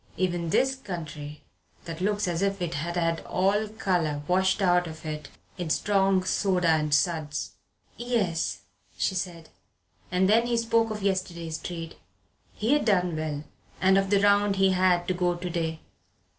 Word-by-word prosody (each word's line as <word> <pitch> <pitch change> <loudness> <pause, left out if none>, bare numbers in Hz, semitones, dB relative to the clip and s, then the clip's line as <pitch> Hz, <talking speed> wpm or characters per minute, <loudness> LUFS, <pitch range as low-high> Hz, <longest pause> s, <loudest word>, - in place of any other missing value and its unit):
Even 175 -2 -1
this 265 +10 +2
country 155 - -7 0.4
that 165 0 -6
looks 205 +1 +1
like 175 - -1
as 165 - -2
if 195 0 0
it 175 -2 -2
had 170 +3 -3
had 165 -1 +1
all 200 +4 +1
the - - -13
colour 165 -8 0
washed 190 +3 +2
out 180 -2 +3
of 160 0 -9
it 155 -1 -5 0.3
in 175 -2 -3
strong 195 +1 +2
soda 185 -2 +1
and 155 -1 +2
suds." 150 -1 0 0.5
"Yes," 180 - -1 0.4
she 190 - 0
said. 175 -3 -4 0.6
And 185 +1 +3
then 230 +4 +4
he 240 -1 +1
spoke 230 0 +2
of 210 -2 -5
yesterday's 170 -4 -2
trade 165 -2 -6 0.6
he 225 +6 +1
had 295 - +2
done 180 -6 +2
well; 155 -2 -3 0.4
and 190 +1 +4
of 195 0 +2
the 200 0 +4
round 205 0 +4
he 195 0 +4
had 180 -1 +2
to 185 - +1
go 180 -1 0
to 180 +1 -5
day. 160 -1 -2
180 Hz, 170 wpm, -27 LUFS, 165-195 Hz, 0.6 s, then